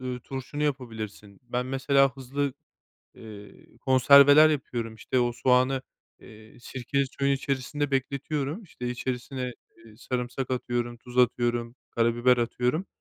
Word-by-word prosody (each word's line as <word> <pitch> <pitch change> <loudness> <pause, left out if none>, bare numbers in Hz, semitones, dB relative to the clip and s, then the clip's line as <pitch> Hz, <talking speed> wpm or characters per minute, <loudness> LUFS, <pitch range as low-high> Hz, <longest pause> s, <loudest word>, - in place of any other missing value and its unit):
ııı, 125 -1 -4
turşunu 135 +3 -6
yapabilirsin. 110 -7 -4
Ben, 125 0 -3
mesela, 135 +1 +2
hızlı, 135 +1 -2 0.6
eee, 105 -2 -13
konserveler 140 +3 +7
yapıyorum, 120 -6 -3
işte, 130 +3 -2
o 120 0 +1
soğanı, 130 +2 +2 0.4
eee, 110 -1 -15
sirkeli 135 +3 -2
suyun 140 0 +2
içerisinde 140 +1 -2
bekletiyorum, 140 - -2
işte, 125 -9 -7
içerisine, 125 +1 -4 0.3
eee, 110 -1 -16
sarımsak 125 +2 -4
atıyorum, 120 -1 -2
tuz 125 +1 -8
atıyorum, 120 -1 +1
karabiber 120 +2 +3
atıyorum. 125 +8 -1
125 Hz, 120 wpm, -27 LUFS, 120-140 Hz, 0.6 s, konserveler